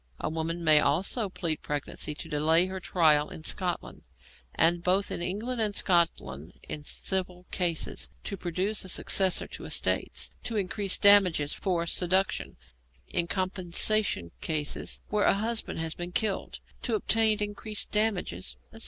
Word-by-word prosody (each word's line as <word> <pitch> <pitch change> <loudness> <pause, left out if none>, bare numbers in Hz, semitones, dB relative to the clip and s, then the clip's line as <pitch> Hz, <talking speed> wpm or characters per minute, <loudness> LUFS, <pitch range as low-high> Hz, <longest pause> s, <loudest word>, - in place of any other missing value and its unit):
A - - -3
woman 165 +2 -4
may 155 -2 +6
also 190 - +1
plead 165 -4 -2
pregnancy 150 +1 -3
to - - -7
delay 160 +4 +3
her 190 0 -6
trial 155 -5 +2
in 160 - -9
Scotland, 180 +1 -3 0.5
and 170 +1 +3
both 190 +3 +1
in - - -4
England 220 +7 -2
and 210 -2 +1
Scotland, 90 - 0
in 150 - -4
civil 180 +3 -2
cases, 175 -3 -1
to 200 - -4
produce 185 +4 -1
a 185 - -6
successor 190 0 +3
to - - -9
estates, - - -1
to 230 - -4
increase 200 0 -1
damages 185 -8 +6
for 175 -4 -2
seduction, 185 +3 0 0.5
in 170 -1 0
compensation 185 - +2
cases 150 -2 -2
where 210 0 +1
a - - +4
husband 225 +3 -1
has 160 -1 -2
been 175 0 -6
killed, 200 +2 -1 0.2
to 235 - -1
obtain 220 +1 +2
increased 210 +1 -4
damages, 180 - 0 0.2
etc. - - -10
180 Hz, 145 wpm, -28 LUFS, 160-205 Hz, 0.5 s, may